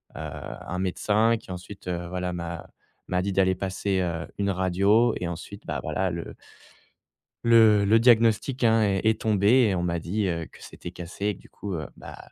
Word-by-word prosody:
un 90 - -6
médecin 105 +5 +2
qui 110 - -12
ensuite, 90 +2 -9
heu, 85 -1 -3
voilà 90 0 -3
m'a 85 -1 -6 0.4
m'a 90 0 0
dit 100 - -1
d'aller 95 -1 +3
passer, 95 +1 -1
heu, 85 -2 -3
une 100 0 +1
radio 100 +5 +3
et 90 - -3
ensuite, 85 -1 -8
bah, - - -2
voilà 95 -1 -1
le 85 0 -6 1.1
le 110 -3 +6
le 110 +3 +4
diagnostic, 115 +2 +3
hein 115 -1 +4
est 100 -2 +1
est 110 - +2
tombé 105 -2 +2 0.2
et 100 - +1
on 85 - -1
m'a 85 -1 -1
dit, 100 +5 -1
heu, 85 -2 -2
que - - -17
c'était 85 - -9
cassé 90 +3 -6
et 105 - +1
que - - -18
du - - -18
coup, 100 - -7
heu, 80 -3 -4
bah, - - -10
95 Hz, 195 wpm, -26 LUFS, 90-105 Hz, 1.1 s, le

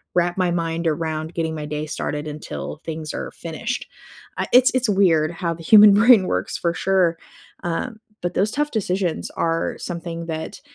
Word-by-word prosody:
wrap 175 +1 +1
my 180 -2 +1
mind 165 0 -2
around 160 0 -2
getting 160 -1 -2
my 150 -1 -5
day 150 +1 -4
started 150 0 -4
until 150 0 -6
things 160 -2 -5
are - - -5
finished. - - -5 0.5
I - - 0
it's 255 +2 +7
it's 250 -2 +2
weird 170 -6 +3
how 170 -1 -2
the 165 - -12
human 210 +4 +8
brain 215 -2 +6
works - - -2
for 170 - 0
sure, 185 -3 +2 0.5
um, 215 +7 -3 0.2
but 175 - -2
those 205 +3 +2
tough 295 +3 0
decisions 185 -5 -1
are 165 0 -1
something 170 -1 -5
that 160 -1 -5
170 Hz, 175 wpm, -22 LUFS, 160-195 Hz, 0.5 s, human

